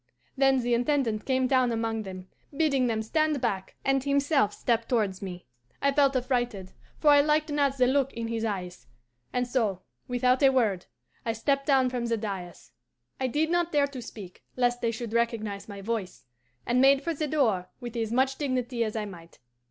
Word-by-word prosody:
"Then 270 -1 +3
the 240 0 0
Intendant 240 -3 0
came 260 -1 +1
down 255 -2 +3
among 225 -1 -1
them, 185 -2 -8 0.3
bidding 275 -5 +2
them 220 -2 -1
stand 310 +4 +1
back, 195 -6 -2
and 270 -1 +2
himself 280 -4 +2
stepped 230 +1 -1
towards 210 -6 0
me. 180 -2 -7 0.3
I 280 - +2
felt 275 -1 +3
affrighted, 245 -7 -1 0.3
for 300 - +4
I 290 0 +7
liked 305 +1 +1
not 280 -2 +1
the 255 - +4
look 270 +1 +2
in 230 -1 -4
his 225 -1 -3
eyes, 180 - -4 0.4
and 250 0 0
so, 215 -7 -1 0.2
without 250 +1 +2
a 275 - +7
word, 220 -9 +1 0.4
I 225 - -1
stepped 275 +5 0
down 265 -3 +3
from 245 -2 -2
the 230 -1 0
dais 195 -5 -6 0.5
I 260 - 0
did 310 +6 0
not 345 -1 +1
dare 290 -2 +3
to 275 -3 -7
speak, 200 -5 -10
lest 245 -1 +1
they 230 - +1
should 230 0 -5
recognize 225 -4 -1
my 200 -1 -7
voice 210 - -4 0.4
and 245 +1 +2
made 275 +1 +5
for 335 - -1
the 305 0 -2
door 220 -12 +1
with 240 -2 -7
as 225 -2 -2
much 265 +2 +1
dignity 255 -4 -1
as 215 -1 -3
I 215 -1 -2
might. 170 -4 -12
245 Hz, 190 wpm, -27 LUFS, 220-275 Hz, 0.5 s, I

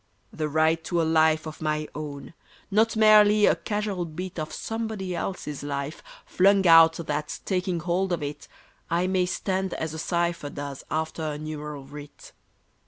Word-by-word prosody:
The 155 -1 -2
right 160 +2 +2
to 175 - 0
a - - +3
life 160 0 +3
of 155 0 -8
my 155 0 -1
own, 145 0 -7 0.4
Not 220 +3 +3
merely 215 -1 +6
a - - +4
casual 205 -4 -3
bit 175 +2 -6
Of 155 0 -4
somebody 220 -5 -4
else's 165 -5 -4
life, 145 +1 -4 0.2
flung 195 +1 +3
out 165 -1 +8
That, 150 -2 -4
taking 180 -3 -1
hold 180 +3 0
of 170 -4 -1
it, 145 +1 -6 0.4
I 170 +2 +1
may 185 -1 +1
stand 190 0 -2
as 160 -1 -4
a 160 - -6
cipher 170 -3 -1
does 140 -1 -7
after 160 +1 -2
a 155 -2 -3
numeral 150 -2 -6
writ. 145 +1 -12
165 Hz, 165 wpm, -26 LUFS, 155-185 Hz, 0.4 s, out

